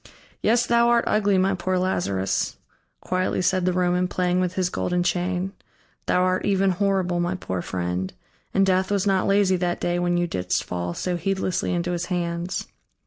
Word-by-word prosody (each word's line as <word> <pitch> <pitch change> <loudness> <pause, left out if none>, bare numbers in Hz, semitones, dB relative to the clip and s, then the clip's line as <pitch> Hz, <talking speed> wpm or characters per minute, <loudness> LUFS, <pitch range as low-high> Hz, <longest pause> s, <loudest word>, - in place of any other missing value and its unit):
"Yes, 235 +2 +3
thou 235 0 +3
art 235 -1 +4
ugly, 205 -2 +2
my 190 +1 +2
poor 185 0 -1
Lazarus," 95 - -1 0.4
quietly 185 0 -1
said 185 0 +2
the 185 - +3
Roman, 180 0 +1
playing 180 0 0
with 185 0 -1
his 180 -1 0
golden 180 0 0
chain; 180 +2 -1 0.6
"thou 180 - +3
art 185 0 +1
even 195 -1 +2
horrible, 185 -2 0
my 175 +2 0
poor 95 - -4
friend; 90 +1 -3 0.4
and 195 - +3
Death 185 0 +2
was 200 -1 +1
not 195 -2 +2
lazy 195 -2 +3
that 175 -1 -1
day 175 0 0
when 175 0 +1
thou 175 0 +2
didst 90 - -1
fall 90 -1 -4
so 180 -1 -2
heedlessly 190 +1 -1
into 175 0 -1
his 175 0 -2
hands. 175 0 -2
180 Hz, 180 wpm, -24 LUFS, 175-190 Hz, 0.6 s, art